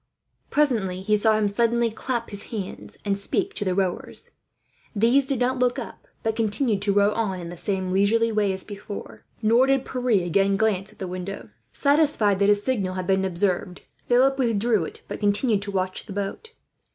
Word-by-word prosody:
Presently 215 -11 +1
he 210 +2 +2
saw 215 +1 +3
him 215 -1 +2
suddenly 235 +2 +1
clap 235 +1 -3
his 200 -1 -5
hands, 205 -5 -7
and 200 -1 +1
speak 370 - 0
to - - -3
the 185 -2 -1
rowers. 185 -2 -3 0.6
These 240 +6 +3
did 275 -2 +1
not 255 +1 0
look 250 +1 +2
up, 250 - -8 0.2
but 220 -1 0
continued 220 -1 0
to 205 0 +1
row 200 +1 +3
on 200 -5 -2
in 170 -1 -7
the 175 - -7
same 190 +1 -2
leisurely 220 +4 +2
way 210 -2 +1
as 190 0 -2
before; 205 0 -9 0.2
nor 235 +4 +4
did 270 -1 +2
Pierre 245 -8 0
again 195 +3 +2
glance 200 -3 0
at - - -21
the 190 - -5
castle. 185 +2 -6 0.2
Satisfied 280 -9 +2
that 200 0 +3
his 205 0 +3
signal 200 -8 -1
had 185 -1 -3
been 190 +1 +2
observed, 185 0 -1 0.2
Philip 265 +3 +3
withdrew 225 -5 +1
it, - - -10
but - - -6
continued 205 +1 +2
to 200 0 -5
watch 185 0 -3
the 200 - -7
boat. 205 - -5
205 Hz, 190 wpm, -24 LUFS, 195-235 Hz, 0.6 s, nor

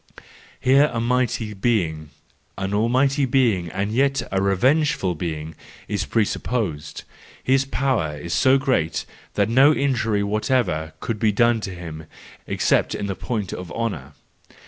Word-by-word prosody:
Here 140 +3 +4
a 115 - -2
mighty 120 -2 0
being, 90 -8 -1 0.5
an 95 +1 -3
almighty 130 +6 +2
being, 115 -10 +2
and 95 +4 -2
yet 135 +3 +1
a 95 - +1
re¬ 100 0 +1
vengeful 135 - +2
being, 80 -1 -5 0.3
is 100 -1 -2
presupposed; 105 -7 -2 0.4
his 135 +1 +2
power 130 - -1
is 85 +4 -5
so 130 +1 +4
great 130 -12 0 0.3
that - - +2
no 130 +6 +6
injury 120 -8 +1
whatever 105 - 0
can 115 - -2
be 110 -1 +3
done 115 +2 +2
to 95 -3 -5
him, 80 -3 -8 0.4
except - - +1
in - - -3
the 100 - -2
point 105 -1 -4
of 90 -1 -7
honour. 85 - -4
110 Hz, 145 wpm, -22 LUFS, 90-130 Hz, 0.5 s, no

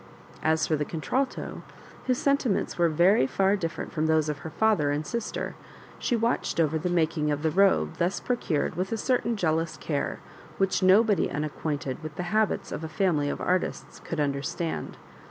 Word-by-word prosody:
As 160 0 +2
for 155 - +1
the 150 - -1
contralto, 250 - -2 0.5
whose 255 -1 +2
sen 280 +1 +3
timents 240 -8 -1
were 170 -1 +3
very 170 0 +4 0.3
different 165 0 -4
from 160 -1 0
those 155 -1 +2
of 150 -1 -3
her 160 - -7
father 160 -3 +2
and 145 +2 -1
sister, 235 +7 -3 0.5
she 245 - 0
watched 230 -5 0
over 160 -1 +2
the 180 +3 -1
making 160 -3 +1
of 145 0 -1
the 160 - +2
robe 195 +3 +3
thus 180 +3 +1
procured 180 -12 -1
with 185 +3 -3
a 225 - 0
certain 235 -1 0
jealous 165 -2 0
care 145 -3 -2 0.4
which 195 +2 +1
nobody 200 +3 +4
unacquainted 145 -2 -3
with 155 -1 -7
the 180 - -3
habits 215 -1 +1
of - - -4
a 160 - -4
family 155 -5 +1
of - - -3
artists 185 0 -1
could 165 - -4
understand. 145 +3 -2
165 Hz, 175 wpm, -27 LUFS, 155-195 Hz, 0.5 s, very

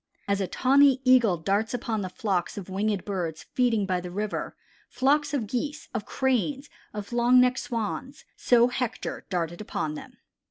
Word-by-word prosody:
"As 200 0 +1
a 190 - -1
tawny 270 +3 +4
Eagle 240 -8 +5
darts 200 +8 0
upon 225 -3 -2
the 185 - -4
flocks 190 -2 -2
of 195 -2 -7
winged 200 0 -1
birds 175 -6 -3
feeding 235 -5 +2
by 185 -2 -1
the 180 - -7
river, 205 +3 -3 0.3
flocks 290 +2 +2
of 275 -6 -1
Geese, 285 +7 -4
of 225 -4 -4
Cranes, 265 +2 -1 0.2
of 210 +2 -7
long 240 +1 +5
necked 250 +1 +3
Swans, 245 +5 -4
so 240 0 +4
Hector 250 0 -4
darted 175 -1 -2
upon 155 -7 -3
them." 155 - -10
225 Hz, 165 wpm, -26 LUFS, 195-255 Hz, 0.3 s, Eagle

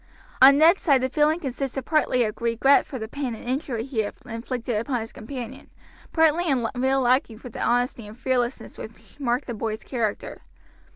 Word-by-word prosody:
On 275 +2 +9
Ned's 330 +5 +5
side 275 -6 +3
the 260 - 0
feeling 305 +4 +2
consisted 270 -2 -4
partly 305 -5 +2
of 215 0 -4
regret 235 +4 +3
for 265 - -6
the 220 -2 -5
pain 260 -1 -4
and - - -11
injury 250 -2 -2
he 260 -3 -4
had 210 -1 -1
inflicted 240 +1 -4
upon 245 +3 -1
his 225 - -7
companion, 240 0 -8 0.4
partly 325 +1 +3
in 255 -6 +1
real 265 +2 +1
liking 250 -2 +2
for 250 +2 -10
the - - -7
honesty 245 -2 0
and 215 +2 -12
fearlessness 250 -1 -2
which - - -12
marked 250 0 0
the 240 - -5
boy's 220 0 -4
character. 230 -5 -3
250 Hz, 185 wpm, -24 LUFS, 230-275 Hz, 0.4 s, On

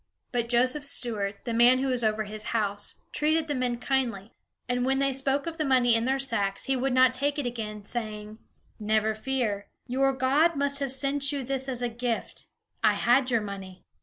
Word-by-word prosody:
But 240 -2 -1
Joseph's 255 +4 +2
steward, 210 -7 -2
the 235 - -3
man 240 +2 +6
who 270 +1 -1
was 250 -2 0
over 215 0 +1
his 215 +1 -6
house, 205 -1 -2 0.2
treated 310 +1 +1
the 295 - -1
men 250 -2 -1
kindly; 235 -6 -2 0.3
and 245 0 0
when 265 +1 +1
they 275 0 +1
spoke 270 +1 0
of 330 -1 -5
the 310 - 0
money 255 -4 +3
in 230 0 +2
their 265 +1 +1
sacks, 210 -7 0
he 270 - 0
would 260 +1 0
not 255 0 +5
take 285 +3 -1
it 290 - -2
again, 215 -4 -5
saying: 215 -1 -5 0.4
"Never 215 0 +1
fear; 215 -3 -2 0.2
your 270 +2 +1
God 275 +6 +2
must 280 0 +1
have 275 -2 -1
sent 275 +1 +3
you 280 -2 -3
this 265 +1 -2
as 250 -1 -3
a - - +1
gift. 235 0 -4 0.4
I - - +5
had 250 +2 +3
your 235 -3 +2
money." 195 -2 -8
250 Hz, 200 wpm, -27 LUFS, 220-270 Hz, 0.4 s, man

